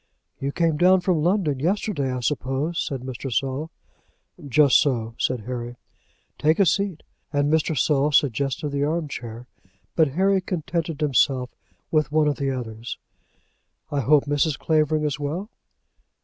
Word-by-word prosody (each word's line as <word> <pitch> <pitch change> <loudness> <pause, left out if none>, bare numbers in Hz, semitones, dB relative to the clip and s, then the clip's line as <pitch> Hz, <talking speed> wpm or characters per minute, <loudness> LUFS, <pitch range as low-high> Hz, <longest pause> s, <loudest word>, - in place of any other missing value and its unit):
"You 135 +1 -2
came 165 0 +1
down 185 +3 +5
from 180 -3 +1
London 170 -5 +1
yesterday, 170 -4 -1
I 125 0 -3
suppose?" 140 +6 -1
said 135 -4 -4
Mr. 130 +1 -6
Saul. 135 +5 -1 0.7
"Just 140 -1 +5
so," 115 -5 -1
said 125 -3 0
Harry. 120 +1 -5 0.6
"Take 155 +2 +3
a 200 - +4
seat;" 190 -1 0 0.3
and 145 +1 +1
Mr. 160 -1 +1
Saul 145 +3 +2
suggested 140 +1 +1
the 140 0 -1
arm 155 +2 -1
chair, 120 -3 -7 0.5
but 160 -2 +4
Harry 190 +3 +2
contented 165 -3 -3
himself 130 -3 +2 0.4
with 155 -2 +1
one 155 0 +3
of 145 - 0
the 140 -1 -1
others. 120 -3 -5 0.9
"I 145 - 0
hope 140 +2 +4
Mrs. 145 0 +1
Clavering 155 -1 +1
is 150 -1 -1
well?" 170 +10 -4
145 Hz, 150 wpm, -24 LUFS, 130-160 Hz, 0.9 s, down